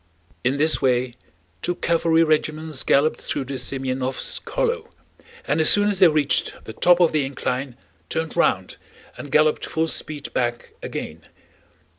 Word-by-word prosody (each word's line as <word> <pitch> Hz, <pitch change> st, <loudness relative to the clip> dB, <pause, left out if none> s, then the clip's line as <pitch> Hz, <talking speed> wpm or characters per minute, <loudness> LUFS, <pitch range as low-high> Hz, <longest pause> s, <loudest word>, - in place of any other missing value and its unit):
In 130 Hz, +3 st, +1 dB
this 155 Hz, +2 st, +2 dB
way 125 Hz, -1 st, +1 dB, 0.5 s
two 175 Hz, -, -2 dB
cavalry 165 Hz, -1 st, +2 dB
regiments 155 Hz, -2 st, 0 dB
galloped 150 Hz, +3 st, +2 dB
through 135 Hz, -, -3 dB
the 135 Hz, -, -6 dB
Semënovsk 130 Hz, 0 st, -3 dB
hollow 485 Hz, -1 st, -1 dB, 0.6 s
and 160 Hz, -, +1 dB
as 155 Hz, -, +6 dB
soon 205 Hz, 0 st, +5 dB
as 200 Hz, -3 st, 0 dB
they 185 Hz, -, +8 dB
reached 150 Hz, -3 st, +1 dB
the 110 Hz, -, -9 dB
top 175 Hz, +8 st, +4 dB
of 175 Hz, -2 st, +4 dB
the 155 Hz, -2 st, +1 dB
incline 130 Hz, -1 st, -4 dB, 0.3 s
turned 160 Hz, -1 st, -3 dB
round 95 Hz, -, +1 dB, 0.4 s
and 145 Hz, -, -9 dB
galloped 155 Hz, +1 st, +3 dB
full 160 Hz, 0 st, -1 dB
speed 150 Hz, -2 st, -4 dB
back 120 Hz, -1 st, -2 dB
again. 80 Hz, +1 st, -6 dB
150 Hz, 150 wpm, -22 LUFS, 130-165 Hz, 0.6 s, they